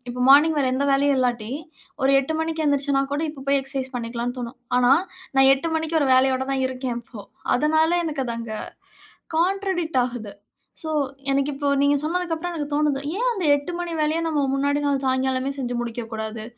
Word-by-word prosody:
இப்போ 250 +1 -3
மார்னிங் 300 +3 +6
வேற 270 - +2
எந்த 280 +2 0
வேலையும் 280 0 +3
இல்லாட்டி 240 -2 -1 0.5
ஒரு 270 - +4
8:00 315 +4 -3
மணிக்கு 320 -1 -2
எந்திரிச்சேன்னா 280 -1 +2
கூட, 295 - -1
இப்ப 275 -3 -11
போய் 280 0 +4
எக்சர்சைஸ் 265 -1 -3
பண்ணிக்கலான்னு 235 +1 -4
தோணும். 240 +1 -7 0.2
ஆனா, 250 +1 +5 0.4
நான் 270 0 +7
8:00 325 +4 -4
மணிக்கு 320 0 0
ஒரு 270 - +1
வேலையோட 260 0 +3
தான் 265 -1 0
இருக்கேன் 255 -2 -4
இப்போ. 225 -3 -11 0.3
அதனால 315 +4 +2
எனக்கு 295 -4 -2
அது 235 - -2
அங்க 225 -2 -5 0.8
கான்ட்ரடிக்ட் 350 -6 +1
ஆகுது. 235 -5 -6 0.5
சோ, 315 - -4 0.4
எனக்கு 275 +1 +1
இப்போ 285 0 -2
நீங்க 285 0 +4
சொன்னதுக்கு 345 +1 -1
அப்புறம் 350 +2 -4
எனக்கு 295 -3 -4
தோணுது. 295 -2 +1 0.2
ஏன் - - +2
அந்த 375 -6 -2
8:00 285 +5 -4
மணி 345 -1 -3
வேலைய, 310 +2 +1
நம்ம 295 -3 0
முன்னாடி 285 +1 +1
நாள் 275 -1 0
சாயங்காலமே 260 +1 0
செஞ்சு 245 -1 -3
முடிக்கக்கூடாது? 225 -2 -5
275 Hz, 180 wpm, -23 LUFS, 255-310 Hz, 0.8 s, நான்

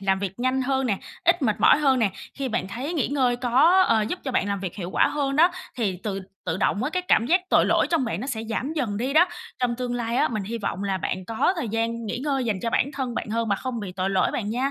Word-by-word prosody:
làm 195 -1 +1
việc 195 +2 -5
nhanh 255 +1 +1
hơn 265 0 0
nè, 200 -4 0 0.3
ít 345 -1 +3
mệt 215 -5 +1
mỏi - - +6
hơn 270 -4 +3
nè. 215 -4 +2 0.2
Khi 275 -2 -3
bạn 220 -5 -2
thấy 265 - -4
nghỉ 305 - 0
ngơi 255 -4 +1
có, 270 +10 +4
ờ, 220 -1 +3
giúp 360 - -3
cho 265 - -2
bạn 200 -4 +1
làm 200 -1 -2
việc 185 -3 -5
hiệu 180 -3 -5
quả - - +3
hơn 275 -1 -1
đó, 340 +4 +6 0.3
thì 205 -7 -1
tự 195 -2 -3 0.2
tự 165 0 -1
động 205 +3 0
á 295 - -1
cái 365 +2 -1
cảm 235 -9 +3
giác 355 +7 +4
tội - - +5
lỗi - - +3
trong 330 -6 +2
bạn 215 -5 -3
nó 260 - -4
sẽ 245 -5 -3
giảm 255 +7 -2
dần 240 -10 -2
đi 255 +5 -1
đó. 345 +4 +5 0.3
Trong 245 -2 0
tương 245 -1 -3
lai 235 0 -2
á, - - +3
mình 215 -4 -3
hy 230 +4 -4
vọng 200 -2 -3
là 195 -1 -1
bạn 185 +1 -3
có 225 - +1
thời 265 -9 -3
gian 230 +1 -2
nghỉ 235 - -3
ngơi 270 -2 -1
dành 205 -5 -1
cho 230 - -1
bản 280 - +1
thân 265 -4 -3
bạn - - -3
hơn 230 0 -1
mà 200 - +2
không 250 -1 -4
bị 190 -3 -6
tội 185 +1 -1
lỗi 190 - +2
bạn 210 -3 -2
nha. 255 +5 0
235 Hz, 290 wpm, -24 LUFS, 205-270 Hz, 0.3 s, mỏi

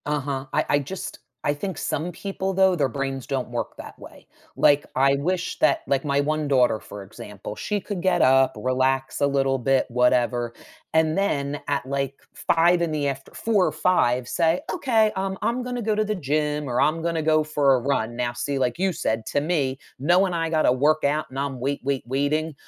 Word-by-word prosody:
Uh-huh. 140 -2 -2
I - - +2
I 145 - +3
just 160 +7 -6 0.2
I 145 - +1
think 190 +4 -5
some 155 +3 -2
people, 195 +2 -4
though, 190 -1 +4
their 145 -5 +1
brains 135 0 -4
don't 135 -3 -3
work 120 0 -4
that - - -10
way. - - -14 0.3
Like, 145 0 +4
I 135 +1 +4
wish 175 +5 -2
that, - - +3
like, 135 +1 0
my 140 -1 +1
one 155 +1 0
daughter, 125 -5 +3
for 105 -1 -10
example, 105 +1 -9
she 210 - -2
could 190 -3 -5
get 180 -2 +2
up, 135 0 +4
relax 130 +1 0
a - - +5
little 135 -1 +1
bit, 135 +1 +1
whatever, 120 -1 +1 0.4
and 160 +1 +2
then, 145 -7 0
at, 140 -2 0
like, 140 0 -2 0.2
5:00 170 +1 +3
in 165 - -1
the 150 -2 -1
after 135 0 -5
4:00 210 -5 +1
or - - 0
5:00, 125 -9 +1
say, 165 +3 +1
"Okay, 225 -9 +2
um, 190 0 -2
I'm 245 +2 0
gonna 245 -1 -4
go 215 -1 0
to 215 0 +1
the 215 - -1
gym, 150 -2 -1
or 120 - 0
I'm 160 +2 +2
gonna 165 -1 -1
go 155 0 +3
for 145 -3 +2
a 130 - +3
run." 120 -3 -1
Now, 120 0 -2
see, 135 +3 -2
like 125 -2 0
you 190 0 +1
said, 110 -7 -2
to 145 - 0
me, 140 -5 -1 0.2
knowing 180 +7 +3
I 165 -1 0
gotta 155 -5 +3
work 150 +5 +2
out 150 +2 +1
and 135 - -5
I'm 140 -2 -3
wait, 140 +3 -2
wait, 135 -1 -1
waiting, 145 +5 -1
145 Hz, 205 wpm, -24 LUFS, 135-170 Hz, 0.4 s, a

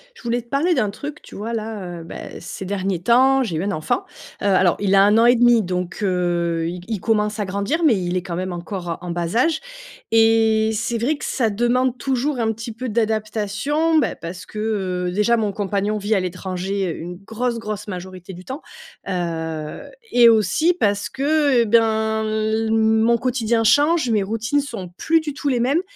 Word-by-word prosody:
Je - - -16
voulais 240 +1 -1
te 235 - -26
parler 320 +6 +2
d'un 210 - +1
truc. 295 +8 -7
Tu - - -13
vois 225 +3 -4
là, 210 -6 -5
heu, - - -10
bah, - - -8
ces 185 +2 -7
derniers 190 -2 -2
temps, 260 +6 +4
j'ai 185 -8 -3
eu 165 - -2
un 200 - -1
enfant. 155 -4 -1 0.4
Heu, - - -3
alors 190 -3 +4
il 200 -1 +1
a 195 - +7
1 205 +2 +4
an 230 - +5
et 245 +1 +6
demi 240 -1 +5
donc, 180 0 -3
heu, 175 -3 0
i 175 +1 -6
il 220 -3 -2
commence 210 0 0
à 205 - 0
grandir, 200 - -1
mais 265 -8 +5
il 180 -1 -2
est - - -1
quand 180 -2 -5
même 185 +1 -3
encore 175 -1 -5
en 175 0 -5
bas 170 +2 -3
âge 315 +5 +2 0.5
et 225 -1 +4
c'est 230 +2 -1
vrai 250 +7 0
que - - -11
ça 235 -4 0
demande 240 +4 +1
toujours 265 +2 -1
un 225 -1 +1
petit 230 +2 -6
peu 250 +3 -5
d'adaptation, 220 +8 0
bah, 275 - 0
parce 175 +2 -8
que, 215 - -8 0.5
heu, - - -2
déjà 210 +5 +2
mon 215 -2 0
compagnon 205 +1 -1
vit 210 +1 0
à - - +3
l'étranger 185 +1 -3
une 175 +3 -7
grosse, 230 +3 -2
grosse 210 -1 -5
majorité 185 -1 -7
du 180 +1 -11
temps. 265 +4 -6 0.5
Heu, 160 -4 -3 0.3
et 240 -1 +7
aussi 225 - +3
parce 205 - 0
que, 265 - -8
heu, 300 0 +3
et - - +2
ben, 220 0 +2
l 220 +1 0
mon 220 +1 +3
quotidien 235 -2 0
change, 290 +4 +3
mes 215 -3 +2
routines 225 +8 -1
sont 225 -10 -7
plus 325 0 +2
du 300 -2 -5
tout 285 - -5
les 250 -3 +1
mêmes 275 +8 +2
220 Hz, 205 wpm, -21 LUFS, 190-240 Hz, 0.5 s, a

